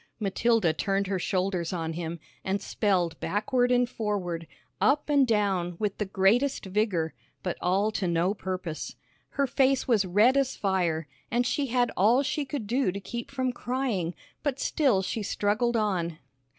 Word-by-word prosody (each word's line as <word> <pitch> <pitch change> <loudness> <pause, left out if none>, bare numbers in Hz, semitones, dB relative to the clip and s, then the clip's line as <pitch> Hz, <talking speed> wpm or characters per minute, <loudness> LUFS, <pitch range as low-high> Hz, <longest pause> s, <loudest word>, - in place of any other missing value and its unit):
Matilda 215 -3 +2
turned 195 +4 0
her 190 -1 -1
shoulders 185 -2 -1
on 165 -3 -3
him, 170 0 -4 0.2
and 195 +1 0
spelled 190 -4 0
backward 245 +4 +1
and 245 0 +4
forward, 190 -8 -3 0.3
up 295 +1 +2
and 280 -3 +5
down, 195 -6 +1
with 205 0 -2
the 210 - -1
greatest 210 +9 +2
vigor, 190 -5 0 0.3
but 180 - -2
all 195 +4 +2
to 195 -3 -1
no 170 +3 +2
purpose. 185 -5 -5 0.4
Her 280 - +3
face 265 0 +2
was 225 -5 +4
red 210 +9 +4
as 275 -1 +1
fire, 175 -6 0 0.2
and 245 +1 +1
she 275 +4 0
had 245 0 +1
all 230 +8 +4
she 285 +2 -1
could 265 -4 -4
do 245 -1 +1
to 200 - -5
keep 235 +4 -6
from 260 -2 -1
crying, 240 -10 -2 0.3
but 280 -3 -1
still 250 -11 +2
she 220 - -2
struggled 210 +4 +1
on. 180 -7 0
205 Hz, 165 wpm, -28 LUFS, 185-245 Hz, 0.4 s, and